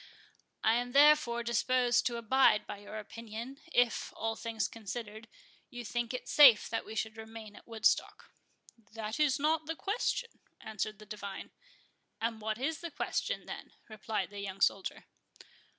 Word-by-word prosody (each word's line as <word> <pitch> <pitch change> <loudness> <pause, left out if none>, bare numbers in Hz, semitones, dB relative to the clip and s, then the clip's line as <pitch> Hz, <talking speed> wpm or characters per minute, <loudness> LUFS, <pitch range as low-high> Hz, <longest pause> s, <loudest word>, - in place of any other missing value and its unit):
"I 220 - +5
am 245 0 -3
therefore 285 -5 +5
disposed 245 0 +2
to 240 -1 -2
abide 230 -2 +4
by 205 - -7
your 205 +1 -8
opinion, 230 +4 -8
if, 245 -5 +2
all 225 0 -2
things 225 -4 -2
considered, 220 0 -7 0.4
you 245 -2 -7
think 240 +1 -2
it 250 - -5
safe 265 -7 +8
that 225 - -2
we 220 - -7
should 220 0 -3
remain 220 -1 -9
at - - -15
Woodstock." 225 -2 0 0.6
"That 220 +4 -4
is 285 -3 +3
not 310 +1 +1
the 325 - -2
question," 465 +5 -2 0.2
answered 215 0 -4
the 215 - -13
divine. 200 -2 -7 0.7
"And 225 -1 -2
what 215 0 -2
is 300 +5 -2
the 340 - -4
question, - - -2
then?" - - -8
replied 215 -2 -3
the 205 - -7
young 195 -1 -5
soldier. 195 -1 +1
230 Hz, 155 wpm, -32 LUFS, 215-255 Hz, 0.7 s, safe